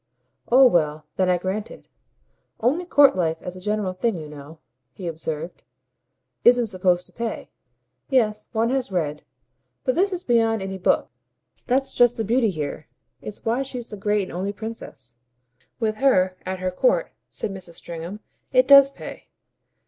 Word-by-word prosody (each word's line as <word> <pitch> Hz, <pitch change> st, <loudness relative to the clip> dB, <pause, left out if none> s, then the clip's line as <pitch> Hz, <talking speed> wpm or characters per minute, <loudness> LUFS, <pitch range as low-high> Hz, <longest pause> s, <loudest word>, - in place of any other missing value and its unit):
"Oh 260 Hz, +2 st, +8 dB
well 155 Hz, -8 st, +2 dB
then 185 Hz, -1 st, +2 dB
I 180 Hz, -, +3 dB
grant 190 Hz, +4 st, -3 dB
it. -, -, -13 dB, 0.7 s
Only 305 Hz, +10 st, 0 dB
court 285 Hz, -, +6 dB
life 165 Hz, -3 st, 0 dB
as 180 Hz, -, -6 dB
a 185 Hz, -, -10 dB
general 210 Hz, -1 st, -1 dB
thing, 225 Hz, +3 st, 0 dB
you 155 Hz, -3 st, -7 dB
know," 150 Hz, +1 st, -11 dB, 0.4 s
he 185 Hz, -, -9 dB
observed, 160 Hz, 0 st, -5 dB, 0.8 s
"isn't 245 Hz, 0 st, +6 dB
supposed 185 Hz, -3 st, +1 dB
to -, -, -19 dB
pay." 235 Hz, -1 st, -5 dB, 0.6 s
"Yes, 215 Hz, -6 st, +1 dB
one 230 Hz, +2 st, +1 dB
has 260 Hz, -6 st, -1 dB
read; 150 Hz, -5 st, -2 dB, 0.6 s
but 255 Hz, -, +1 dB
this 385 Hz, +6 st, +2 dB
is 360 Hz, -1 st, -3 dB
beyond 225 Hz, -3 st, +2 dB
any 190 Hz, 0 st, -5 dB
book. -, -, +1 dB, 0.6 s
That's 270 Hz, +2 st, +1 dB
just 245 Hz, -1 st, +4 dB
the 225 Hz, -, -1 dB
beauty 230 Hz, +1 st, +2 dB
here; 150 Hz, -3 st, -5 dB, 0.3 s
it's 210 Hz, -, -9 dB
why 235 Hz, +4 st, +1 dB
she's 250 Hz, -3 st, -6 dB
the -, -, -5 dB
great 205 Hz, 0 st, 0 dB
and 185 Hz, -, -8 dB
only 190 Hz, +3 st, -2 dB
princess. 205 Hz, -, -8 dB, 0.6 s
With 215 Hz, -2 st, -1 dB
her, 190 Hz, -9 st, +3 dB
at 190 Hz, 0 st, -2 dB
her 185 Hz, 0 st, -2 dB
court," -, -, +1 dB, 0.2 s
said -, -, -4 dB
Mrs. 185 Hz, -3 st, -8 dB
Stringham, 170 Hz, +5 st, -7 dB, 0.3 s
"it -, -, +4 dB
does 275 Hz, -1 st, +9 dB
pay." 275 Hz, -, -10 dB
210 Hz, 165 wpm, -23 LUFS, 180-245 Hz, 0.8 s, does